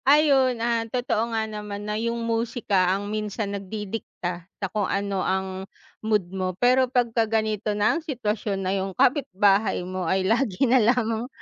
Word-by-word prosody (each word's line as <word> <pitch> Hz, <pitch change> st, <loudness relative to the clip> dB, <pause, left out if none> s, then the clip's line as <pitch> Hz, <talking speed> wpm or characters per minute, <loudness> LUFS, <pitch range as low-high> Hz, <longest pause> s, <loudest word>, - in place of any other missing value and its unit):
Ayun, 275 Hz, -4 st, +5 dB
ah, 230 Hz, -1 st, 0 dB
totoo 235 Hz, -2 st, -1 dB
nga 220 Hz, -, +1 dB
naman 210 Hz, -1 st, -6 dB
na 210 Hz, +1 st, -2 dB
yung 235 Hz, 0 st, -2 dB
musika, 225 Hz, -5 st, +1 dB
ang 205 Hz, +1 st, -5 dB
minsan 210 Hz, -1 st, -3 dB
nagdidikta 190 Hz, -3 st, -6 dB
sa 195 Hz, -, -3 dB
kung 205 Hz, -3 st, 0 dB
ano 200 Hz, -1 st, -1 dB
ang 190 Hz, 0 st, -2 dB, 0.3 s
mood 210 Hz, -5 st, 0 dB
mo. 185 Hz, -1 st, -2 dB
Pero, 255 Hz, +1 st, +4 dB
'pagka 235 Hz, -3 st, +1 dB
ganito 215 Hz, -1 st, 0 dB
na 210 Hz, +7 st, +2 dB
ang -, -, -2 dB
sitwasyon 215 Hz, -, -2 dB
na 185 Hz, -, 0 dB
yung 195 Hz, -1 st, -2 dB
kapitbahay 215 Hz, -8 st, +2 dB
mo 185 Hz, -1 st, -4 dB
ay 190 Hz, +1 st, +1 dB
lagi 225 Hz, +1 st, +1 dB
na 255 Hz, 0 st, +4 dB
lang 230 Hz, 0 st, +1 dB
215 Hz, 165 wpm, -25 LUFS, 195-235 Hz, 0.3 s, Ayun